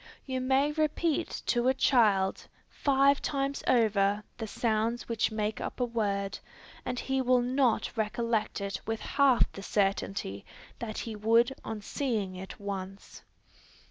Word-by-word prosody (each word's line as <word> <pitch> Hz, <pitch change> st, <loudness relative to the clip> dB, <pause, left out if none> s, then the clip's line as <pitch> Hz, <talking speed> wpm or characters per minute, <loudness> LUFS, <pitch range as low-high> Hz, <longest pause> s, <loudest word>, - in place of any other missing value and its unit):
You 260 Hz, -1 st, -2 dB
may 270 Hz, +3 st, +2 dB
repeat 310 Hz, +1 st, -1 dB
to 240 Hz, 0 st, +1 dB
a 260 Hz, -, +3 dB
child 210 Hz, -8 st, +3 dB, 0.2 s
five 275 Hz, 0 st, +3 dB
times 275 Hz, -1 st, -2 dB
over 210 Hz, -4 st, +3 dB, 0.2 s
the 225 Hz, -, -3 dB
sounds 225 Hz, +2 st, -1 dB
which 230 Hz, -2 st, +1 dB
make 215 Hz, 0 st, -2 dB
up -, -, -5 dB
a 250 Hz, -, +2 dB
word, 200 Hz, -4 st, -2 dB, 0.4 s
and 250 Hz, -1 st, -3 dB
he 265 Hz, 0 st, 0 dB
will 250 Hz, -1 st, +3 dB
not 250 Hz, -2 st, +1 dB
recollect 220 Hz, -1 st, -1 dB
it 200 Hz, -1 st, -3 dB
with 225 Hz, 0 st, -1 dB
half 275 Hz, -4 st, +3 dB
the 195 Hz, -, -9 dB
certainty 195 Hz, -, -1 dB, 0.4 s
that 220 Hz, -2 st, -5 dB
he 225 Hz, -2 st, -4 dB
would 230 Hz, +4 st, +3 dB
on 220 Hz, -1 st, -5 dB
seeing 215 Hz, -10 st, -2 dB
it 190 Hz, +1 st, -8 dB
once. 195 Hz, -1 st, -6 dB
230 Hz, 140 wpm, -29 LUFS, 205-260 Hz, 0.4 s, a